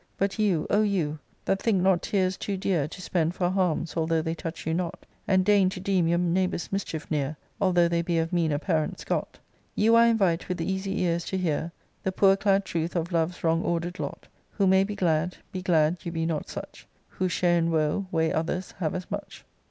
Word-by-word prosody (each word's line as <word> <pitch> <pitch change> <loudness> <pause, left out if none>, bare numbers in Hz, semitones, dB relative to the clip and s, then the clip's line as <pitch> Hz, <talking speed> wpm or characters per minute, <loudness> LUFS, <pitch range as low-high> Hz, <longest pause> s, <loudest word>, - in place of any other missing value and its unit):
But 195 +2 -1
you, 195 -7 +2
O 205 - +4
you, 175 -8 0 0.3
that 195 - 0
think 200 -6 +2
hot 185 -2 +3
tears 190 -2 0
too 200 +1 -3
dear 180 -6 0
To 160 - -10
spend 170 -1 0
for 175 -1 0
harms, 180 -4 0
although 160 -1 +1
they 160 - -1
touch 165 0 -6
you 160 - 0
not, 175 +1 -3 0.2
And 185 -1 +3
deign 200 -2 +5
to 185 - -6
deem 185 -3 +1
your 170 +1 +2
neighbours' 180 +1 0
mischief 185 -6 -4
near, 150 0 -1 0.2
Although 180 -3 +4
they 170 0 +1
be 170 0 -1
of 165 +1 -1
meaner 160 -4 +2
parents 155 -1 -1
got: - - -2 0.4
You 225 +2 +4
I 230 0 +7
invite 190 -8 +1
with 180 - -2
easy 190 +3 -2
ears 170 -1 0
to 190 - -2
hear 165 -2 -1 0.3
The 190 - -1
poor 195 +1 +5
clad 195 0 +2
truth 170 -1 -2
of 170 +1 -1
love's 170 +1 -1
wrong 165 0 +2
order'd 175 +1 -2
lot. - - -5 0.3
Who 200 - +1
may 190 0 +5
be 205 +1 -4
glad, 170 -1 0
be 185 - -4
glad 165 -2 +2
you 170 - -4
be 165 -1 -2
not 160 -2 -2
such; - - -8 0.2
Who 185 0 -2
share 175 0 +2
in 165 0 +1
woe, 160 +4 0
weigh 160 -2 +1
others 175 +3 -2
have 160 -4 -1
as 185 0 -6
much. - - -6
175 Hz, 215 wpm, -27 LUFS, 165-190 Hz, 0.4 s, I